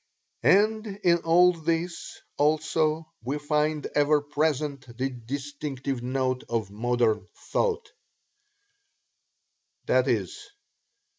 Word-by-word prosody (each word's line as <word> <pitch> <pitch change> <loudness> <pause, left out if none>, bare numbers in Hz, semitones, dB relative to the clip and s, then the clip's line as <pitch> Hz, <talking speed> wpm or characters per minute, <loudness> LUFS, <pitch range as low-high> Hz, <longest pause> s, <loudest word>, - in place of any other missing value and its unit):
And 215 +2 +3 0.2
in 170 -1 +4
all 175 +2 +5
this, 165 +1 -3
also, 155 +1 +1
we 135 +5 -2
find 150 0 0
ever 150 +1 +4
present 145 -4 -2
the 130 +2 0
distinctive 135 +1 -5
note 130 0 -1
of 110 -4 -2
modern 110 -2 0 0.2
thought, 460 -2 0 2.0
viz. 420 - +1
150 Hz, 85 wpm, -26 LUFS, 130-165 Hz, 2.0 s, all